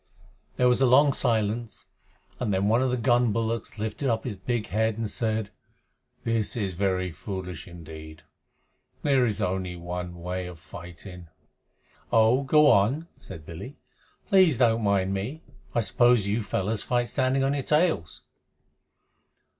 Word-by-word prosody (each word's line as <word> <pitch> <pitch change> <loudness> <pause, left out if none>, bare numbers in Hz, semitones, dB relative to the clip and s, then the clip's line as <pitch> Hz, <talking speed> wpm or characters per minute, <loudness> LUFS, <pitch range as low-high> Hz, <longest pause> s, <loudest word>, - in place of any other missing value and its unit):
There 125 - +3
was 125 +1 +3
a 135 - +5
long 140 +3 +5
silence, 115 -2 0 0.5
and 115 -4 -1
then 95 +1 +1
one 115 +4 +3
of 130 - +1
the 125 - 0
gun 120 -1 +3
bullocks 115 0 -2
lifted 110 +6 -2
up 115 -1 0
his 115 -5 -4
big 110 +4 -2
head 110 +1 0
and 115 -1 -2
said, 110 -1 -2 0.7
"This 115 -1 -1
is 100 -5 -2
very 95 0 -1
foolish 90 +2 -7
indeed. 80 -2 -11 0.8
There 135 -4 +3
is 105 - -2
only 90 -1 -2
one 90 0 -6
way 90 +1 -4
of 90 -2 -9
fighting." 90 +2 -11 0.8
"Oh, 115 +4 +4
go 150 +3 +4
on," 135 +12 +2
said 80 -6 -11
Billy. 100 - -9 0.5
"Please 185 - +5
don't 115 -2 +3
mind 95 -2 +1
me. 120 +12 -4 0.3
I 120 - +3
suppose 120 -1 +3
you 105 +3 0
fellows 105 +1 -2
fight 120 -1 0
standing 130 +1 +1
on 135 +1 +1
your 145 - -1
tails?" 150 - 0
110 Hz, 150 wpm, -26 LUFS, 95-125 Hz, 0.8 s, a